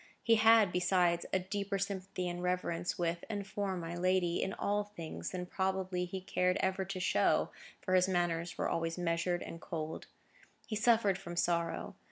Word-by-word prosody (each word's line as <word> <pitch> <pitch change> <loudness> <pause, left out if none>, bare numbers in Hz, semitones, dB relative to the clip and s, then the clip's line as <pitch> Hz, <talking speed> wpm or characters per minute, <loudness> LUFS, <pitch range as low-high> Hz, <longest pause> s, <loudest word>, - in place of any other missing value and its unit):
He 230 - +4
had, 220 -3 +6
besides, 180 -1 +2
a - - +3
deeper 200 +2 -2
sympathy 195 -2 -3
and 175 0 -4
reverence 180 -1 -1
with, 170 -1 -1
and 205 -2 -3
for, 195 -1 -2
my 170 0 -5
lady, 180 -1 +1
in - - -1
all 205 +1 0
things, 205 -6 -6
than 180 -1 -4
probably 190 -1 -1
he 185 +1 -6
ever 180 +1 +2
cared - - -18
to 190 - -3
show, 180 - +2 0.3
for 185 - -2
his 185 0 +5
manners 175 -2 0
were - - 0
always 165 0 -1
measured 175 0 0
and 165 - -8
cold. 160 -3 -5 0.6
He 215 - -4
suffered 215 -4 +3
from 175 -3 -7
sorrow. 170 -1 0
180 Hz, 175 wpm, -33 LUFS, 175-195 Hz, 0.6 s, had